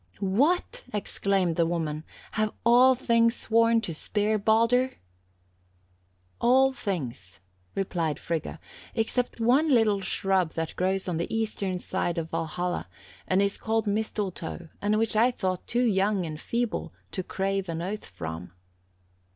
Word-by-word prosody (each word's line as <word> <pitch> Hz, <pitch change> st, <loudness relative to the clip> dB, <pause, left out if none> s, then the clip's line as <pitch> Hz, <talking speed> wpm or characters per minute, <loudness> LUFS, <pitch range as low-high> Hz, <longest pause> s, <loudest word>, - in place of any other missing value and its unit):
"'What!' 300 Hz, -, +1 dB
exclaimed 195 Hz, -4 st, 0 dB
the 170 Hz, -, +4 dB
woman, 160 Hz, -3 st, -2 dB, 0.3 s
'have 215 Hz, -1 st, 0 dB
all 250 Hz, +2 st, +7 dB
things 230 Hz, -1 st, +3 dB
sworn 230 Hz, 0 st, +3 dB
to 180 Hz, -6 st, -3 dB
spare 210 Hz, +6 st, 0 dB
Baldur?' 230 Hz, +5 st, +3 dB, 1.4 s
"'All 265 Hz, +2 st, +4 dB
things,' 125 Hz, -, -5 dB, 0.4 s
replied 170 Hz, -5 st, -1 dB
Frigga, 165 Hz, -2 st, -4 dB, 0.4 s
'except 235 Hz, +2 st, -1 dB
one 260 Hz, +8 st, +4 dB
little 220 Hz, -5 st, +4 dB
shrub 190 Hz, -3 st, +1 dB
that 165 Hz, -1 st, -3 dB
grows 190 Hz, +1 st, 0 dB
on 175 Hz, -3 st, -1 dB
the 170 Hz, -, -3 dB
eastern 210 Hz, -4 st, -1 dB
side 180 Hz, -1 st, -2 dB
of 165 Hz, -1 st, -3 dB
Valhalla, 165 Hz, -, -2 dB, 0.4 s
and 190 Hz, +2 st, +3 dB
is 200 Hz, 0 st, -1 dB
called 225 Hz, -1 st, 0 dB
Mistletoe, 200 Hz, -5 st, -3 dB
and 210 Hz, +1 st, +2 dB
which 225 Hz, 0 st, +1 dB
I 230 Hz, +4 st, +5 dB
thought 185 Hz, -7 st, -3 dB
too 245 Hz, +1 st, +1 dB
young 200 Hz, -3 st, +2 dB
and 155 Hz, -1 st, -6 dB
feeble 235 Hz, -1 st, -2 dB, 0.2 s
to 190 Hz, -, -2 dB
crave 195 Hz, 0 st, -2 dB
an 165 Hz, 0 st, -3 dB
oath 210 Hz, +4 st, -4 dB
from.' 85 Hz, -1 st, -7 dB
200 Hz, 135 wpm, -27 LUFS, 175-230 Hz, 1.4 s, all